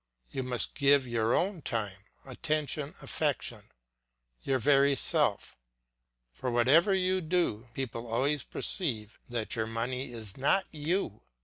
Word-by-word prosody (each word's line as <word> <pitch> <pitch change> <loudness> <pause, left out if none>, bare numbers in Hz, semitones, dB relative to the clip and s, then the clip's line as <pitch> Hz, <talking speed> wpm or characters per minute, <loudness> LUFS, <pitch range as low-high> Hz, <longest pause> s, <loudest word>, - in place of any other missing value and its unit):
You 135 - -2
must 125 -2 -1
give 140 -2 +4
your 115 -1 +1
own 185 -2 0
time, 105 -6 -3 0.2
attention, 150 +2 -2
affection, - - -2 0.7
your 135 - +1
very 140 +2 +4
self; - - +2 0.8
for 125 - -3
whatever 130 - +4
you 185 0 +1
do, 155 - 0
people 120 -3 -4
always 135 +5 +1
perceive 120 - -2
that 115 -2 -2
your 110 -1 -1
money 120 +3 -3
is 110 -5 -4
not 145 +8 +2
you. 155 - -2
130 Hz, 125 wpm, -30 LUFS, 115-150 Hz, 0.8 s, give